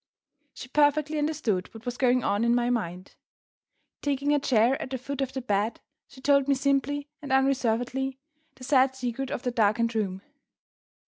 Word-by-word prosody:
She -, -, -8 dB
perfectly 300 Hz, +2 st, +2 dB
understood 295 Hz, -11 st, -1 dB
what 225 Hz, -, -11 dB
was 245 Hz, 0 st, -3 dB
going 255 Hz, -2 st, +3 dB
on 205 Hz, +2 st, +1 dB
in 235 Hz, 0 st, +3 dB
my 245 Hz, 0 st, +1 dB
mind. 185 Hz, -6 st, -3 dB, 0.9 s
Taking 285 Hz, 0 st, 0 dB
a 295 Hz, -, +3 dB
chair 250 Hz, -1 st, +2 dB
at -, -, -5 dB
the 260 Hz, -, -3 dB
foot 275 Hz, +2 st, -5 dB
of 265 Hz, -1 st, -2 dB
the 265 Hz, -2 st, -4 dB
bed, 210 Hz, 0 st, 0 dB, 0.3 s
she 260 Hz, -, -15 dB
told 280 Hz, 0 st, +3 dB
me 280 Hz, -, +3 dB
simply 280 Hz, +1 st, 0 dB
and 285 Hz, -2 st, -7 dB
unreservedly 265 Hz, 0 st, +1 dB, 0.4 s
the 255 Hz, -, -14 dB
sad 265 Hz, 0 st, +3 dB
secret 255 Hz, +1 st, -3 dB
of 245 Hz, -, -4 dB
the 250 Hz, -, -1 dB
darkened 230 Hz, +1 st, +2 dB
room. 195 Hz, -3 st, -2 dB
260 Hz, 175 wpm, -27 LUFS, 230-275 Hz, 0.9 s, going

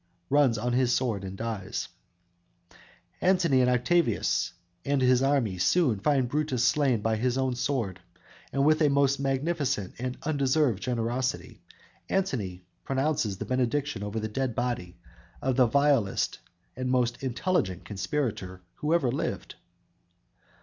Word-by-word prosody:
"_ -, -, -44 dB, 0.3 s
(Runs 140 Hz, -5 st, +4 dB
on 120 Hz, +3 st, -1 dB
his 125 Hz, 0 st, +2 dB
sword 115 Hz, -7 st, -1 dB
and 95 Hz, 0 st, -6 dB
dies.) 110 Hz, -4 st, -4 dB, 1.3 s
Antony 175 Hz, -8 st, +3 dB
and 125 Hz, -, +3 dB
Octavius 120 Hz, -, +1 dB, 0.3 s
and 140 Hz, 0 st, +1 dB
his 130 Hz, -1 st, +4 dB
army 135 Hz, -9 st, +1 dB
soon 130 Hz, -, +2 dB
find 135 Hz, +2 st, +2 dB
Brutus 140 Hz, -2 st, 0 dB
slain 130 Hz, -3 st, +2 dB
by 110 Hz, 0 st, 0 dB
his 125 Hz, +3 st, 0 dB
own 130 Hz, -1 st, +1 dB
sword, 125 Hz, -7 st, -2 dB, 0.5 s
and 140 Hz, 0 st, +1 dB
with 155 Hz, +1 st, +4 dB
a 150 Hz, -, +5 dB
most 140 Hz, 0 st, +2 dB
magnificent 135 Hz, -, -1 dB
and 125 Hz, +1 st, -3 dB
undeserved 140 Hz, -6 st, +1 dB
generosity 120 Hz, -6 st, -2 dB, 0.5 s
Antony 105 Hz, -, -2 dB, 0.2 s
pronounces 135 Hz, -7 st, 0 dB
this -, -, -6 dB
benediction 130 Hz, 0 st, -1 dB
over 105 Hz, +2 st, -3 dB
the 110 Hz, -, -2 dB
dead 125 Hz, +2 st, -2 dB
body 115 Hz, -8 st, -3 dB, 0.4 s
of 130 Hz, -1 st, 0 dB
the 125 Hz, -2 st, +5 dB
vilest 140 Hz, -6 st, +2 dB, 0.4 s
and 130 Hz, 0 st, -3 dB
most 125 Hz, -1 st, +1 dB
intelligent 130 Hz, -, -1 dB
conspirator 100 Hz, -4 st, -3 dB
who 155 Hz, +3 st, +1 dB
ever 135 Hz, -8 st, +1 dB
lived! 135 Hz, -, -3 dB
125 Hz, 135 wpm, -28 LUFS, 110-140 Hz, 1.3 s, a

